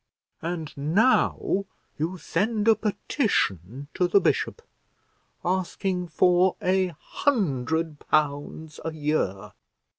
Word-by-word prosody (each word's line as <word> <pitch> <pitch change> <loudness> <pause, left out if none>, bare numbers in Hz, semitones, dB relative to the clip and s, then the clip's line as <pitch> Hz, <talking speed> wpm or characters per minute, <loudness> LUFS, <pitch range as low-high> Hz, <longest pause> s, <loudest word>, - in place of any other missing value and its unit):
And 165 -2 -4
now 195 - +2 0.3
you 170 +5 -2
send 210 +6 -1
a 225 - +8
petition 145 - -1
to 180 - +1
the 190 +3 +5
bishop, 465 - 0 0.8
asking 185 0 -1
for 180 +2 +3
a 185 -2 +1
hundred 160 - 0
pounds 150 +1 -1
a 160 - -2
year! 145 -11 -1
170 Hz, 95 wpm, -26 LUFS, 150-190 Hz, 0.8 s, a